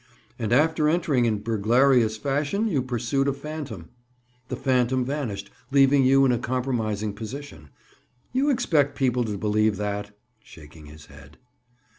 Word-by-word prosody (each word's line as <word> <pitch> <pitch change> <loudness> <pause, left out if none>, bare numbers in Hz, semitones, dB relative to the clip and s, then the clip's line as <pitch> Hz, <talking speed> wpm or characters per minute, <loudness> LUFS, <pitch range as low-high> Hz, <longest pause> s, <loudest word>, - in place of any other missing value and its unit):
"And 110 -2 -2
after 150 +3 +3
entering 155 -7 +1
in 105 -3 -1
burglarious 115 +1 +2
fashion 145 - -1
you 155 -11 0
pursued 130 +2 -1
a 140 - +1
phantom. 140 - -7 0.6
The - - -4
phantom 130 -1 +1
vanished, 120 -8 -4 0.2
leaving 135 0 +4
you 135 +1 +5
in 130 - +3
a 120 - 0
compromising 115 -5 -2
position. 115 - -9 0.6
You 270 +3 +2
expect 160 - +1
people 125 -2 +1
to 105 -2 -4
believe 105 +1 +1
that?" 105 0 -4 0.2
Shaking 75 -3 -15
his 75 0 -13
head. 70 +1 -16
125 Hz, 140 wpm, -24 LUFS, 105-140 Hz, 0.6 s, you